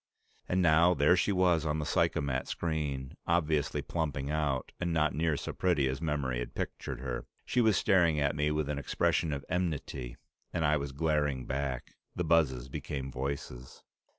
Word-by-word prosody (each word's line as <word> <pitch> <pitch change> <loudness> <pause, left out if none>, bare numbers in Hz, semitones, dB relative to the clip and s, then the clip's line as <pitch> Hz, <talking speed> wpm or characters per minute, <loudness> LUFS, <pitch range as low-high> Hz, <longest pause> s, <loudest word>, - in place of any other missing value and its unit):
And 90 0 +2
now, 85 +2 +5
there 75 +5 +5
she 95 - +1
was 90 -4 +3
on 80 -1 0
the 75 - -2
psychomat 70 -2 0
screen, 75 -5 -2
obviously 80 -4 +1
plumping 75 -4 -2
out, 75 -4 -1
and 90 -1 -1
not 75 -3 +2
nearly 80 0 +1
so - - -5
pretty 85 -7 +2
as 65 +3 -3
memory 70 -6 -1
had - - -6
pictured - - -4
her. 60 -3 -4 0.2
She 125 - +2
was 110 -4 +4
staring 85 -6 +3
at 70 -1 +1
me 75 0 +1
with 75 -1 0
an 75 -1 -2
expression 75 +3 +1
of 70 -1 -4
enmity, 75 -8 -3 0.3
and 85 -2 0
I 75 +1 +4
was 70 -2 -2
glaring 75 -3 0
back. 70 -1 -3 0.2
The 90 - -1
buzzes 75 -7 +2
became 65 0 -5
voices. 65 -2 -5
75 Hz, 175 wpm, -31 LUFS, 70-80 Hz, 0.3 s, now